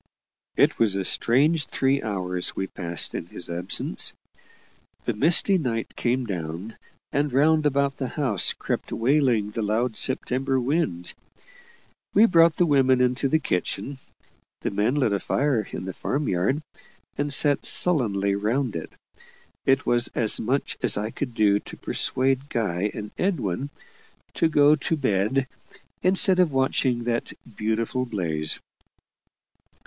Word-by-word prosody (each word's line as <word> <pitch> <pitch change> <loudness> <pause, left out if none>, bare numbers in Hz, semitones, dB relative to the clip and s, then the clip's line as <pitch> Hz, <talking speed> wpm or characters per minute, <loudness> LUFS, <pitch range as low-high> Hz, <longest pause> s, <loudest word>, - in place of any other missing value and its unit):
It - - +2
was 105 -4 +2
a 100 - -1
strange 145 - +2
three 135 +1 0
hours 90 -4 -2
we 95 - -2
passed 85 -3 -3
in - - -5
his 85 0 -5
absence. 85 -7 0 0.9
The - - -1
misty 170 - +5
night 115 -6 -4
came 125 +1 -1
down, 90 +1 -6 0.4
and 145 0 -1
round 155 +3 +3
about 140 -1 0
the 130 - -3
house 125 - 0
crept - - -5
wailing 120 -4 +1
the 115 - -4
loud 110 +2 -1
September 130 0 -1
wind. 125 - -1 1.0
We 210 +3 +7
brought 165 -5 +4
the 175 - +2
women 135 -4 +3
into 125 +2 +1
the 160 - +3
kitchen 130 - -3 0.6
the - - -3
men 105 +6 0
lit 130 -8 +1
a 100 - 0
fire 135 -5 -1
in - - -6
the 95 - -5
farm 145 - -3
yard, 100 - -1 0.5
and 145 0 -2
sat 145 +1 +5
sullenly 105 - +4
round 110 +4 -1
it. 80 - -6 0.8
It 135 +1 +2
was 120 0 +2
as 110 -2 +3
much 130 +5 -2
as - - +2
I 105 +2 -3
could 125 -5 -5
do 105 -3 +3
to - - -12
persuade 135 +2 -1
Guy 105 -3 -1
and 105 -1 -7
Edwin 140 - -2 0.6
to 165 - +1
go 145 -1 +5
to 160 - -2
bed, 130 +1 0 0.6
instead 185 0 +4
of 180 -4 +3
watching 130 -2 0
that 120 0 -3 0.2
"beautiful 110 +4 -2
blaze." 80 -8 -2
125 Hz, 145 wpm, -24 LUFS, 105-140 Hz, 1.0 s, We